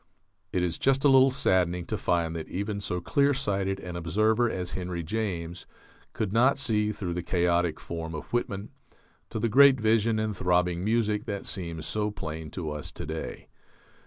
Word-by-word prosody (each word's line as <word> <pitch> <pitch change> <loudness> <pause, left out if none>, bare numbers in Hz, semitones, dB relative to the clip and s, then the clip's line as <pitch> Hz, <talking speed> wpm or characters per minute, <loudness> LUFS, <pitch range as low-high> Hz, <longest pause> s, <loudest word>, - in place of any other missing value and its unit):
It 90 - 0
is 90 -1 -1
just 135 0 +2
a - - +7
little 135 0 +7
saddening 90 -9 +1
to - - -2
find 85 -2 0
that 80 - -5
even 100 +2 -3
so 90 -2 -2
clear 140 +7 +2
sighted 95 -7 -1
an 90 -1 -7
observer 110 +8 +2
as 90 -3 -3
Henry 90 -2 -4
James 90 -3 -3 0.5
could 105 -2 -2
not 125 +4 +4
see 105 -5 +1
through 95 -4 -4
the 90 - -2
chaotic 85 -2 +1
form 80 -1 -5
of 75 - -8
Whitman 105 -4 -2 0.6
to - - -4
the 115 - +1
great 135 +3 +6
vision 110 0 +2
and 110 -1 -1
throbbing 90 -1 +1
music 105 -1 +1
that 100 -1 -4
seem 85 -4 -4
so 105 +6 -1
plain 80 -6 -6
to 80 -1 -4
us 75 -1 -5
to - - -5
day. 80 +1 -6
95 Hz, 180 wpm, -27 LUFS, 85-110 Hz, 0.6 s, a